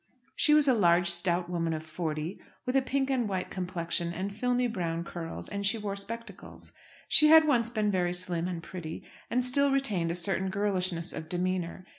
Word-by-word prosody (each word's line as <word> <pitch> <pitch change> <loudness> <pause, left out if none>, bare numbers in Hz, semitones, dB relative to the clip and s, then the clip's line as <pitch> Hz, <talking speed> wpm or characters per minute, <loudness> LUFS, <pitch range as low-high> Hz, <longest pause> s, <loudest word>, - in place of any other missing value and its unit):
She 300 - +4
was 300 -1 +4
a 260 - +6
large 175 -4 +4
stout 175 0 0
woman 165 -2 -1
of 155 0 -5
forty, 160 +1 -4 0.2
with 250 +1 -1
a 270 - +5
pink 270 +1 0
and 245 -5 +1
white 185 -2 -3
complexion 175 -2 -2
and 195 +3 -4
filmy 250 +2 +1
brown 170 -6 -2
curls; 170 -1 -6
and 200 0 -4
she 200 +3 +1
wore 205 -2 -3
spectacles. 210 0 -8 0.4
She 305 - +6
had 320 0 +8
once 240 -6 +2
been 215 -3 0
very 175 -2 +1
slim 180 -1 -2
and 175 -2 -4
pretty, 170 -4 -7 0.3
and 250 +1 +1
still 280 +3 +2
retained 220 -12 +1
a 170 - -1
certain 190 +2 0
girlishness 185 -4 -1
of 160 - -7
demeanour. 180 0 -2
185 Hz, 190 wpm, -29 LUFS, 170-230 Hz, 0.4 s, had